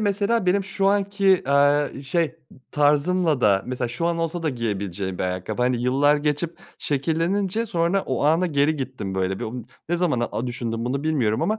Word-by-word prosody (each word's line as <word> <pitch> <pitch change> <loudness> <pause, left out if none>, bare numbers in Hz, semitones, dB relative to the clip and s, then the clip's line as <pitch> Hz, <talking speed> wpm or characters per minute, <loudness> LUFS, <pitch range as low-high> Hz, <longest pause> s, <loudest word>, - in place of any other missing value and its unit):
mesela 205 0 +1
benim 195 +2 +2
şu 195 0 -1
anki, 200 -1 +2
aaa, 145 0 +2
şey, 165 +5 +1
ı 150 - -6 0.4
tarzımla 150 +1 +2
da 100 -4 +3
mesela 125 -1 -2
şu 120 +8 -2
an 170 0 0
olsa 165 +1 -2
da 160 - 0
giyebileceğim 100 - -3
bir - - -1
ayakkabı, 90 +6 -3
hani, 125 -1 +1
yıllar 140 +4 +3
geçip 150 +3 -2 0.2
şekillenince 175 +9 -1
sonra 175 0 +1
o 130 +1 -1
ana 165 +5 +3
geri 150 -1 +1
gittim 130 -8 -5
böyle. 95 0 -1
Bir - - -4
o 110 - -5 0.4
ne 175 - +1
zaman, 170 -9 +1
aaa, 120 - -2
düşündüm 115 -1 -3
bunu 135 +4 -2
bilmiyorum 125 -9 +1
ama 215 +1 0
145 Hz, 185 wpm, -23 LUFS, 125-175 Hz, 0.4 s, da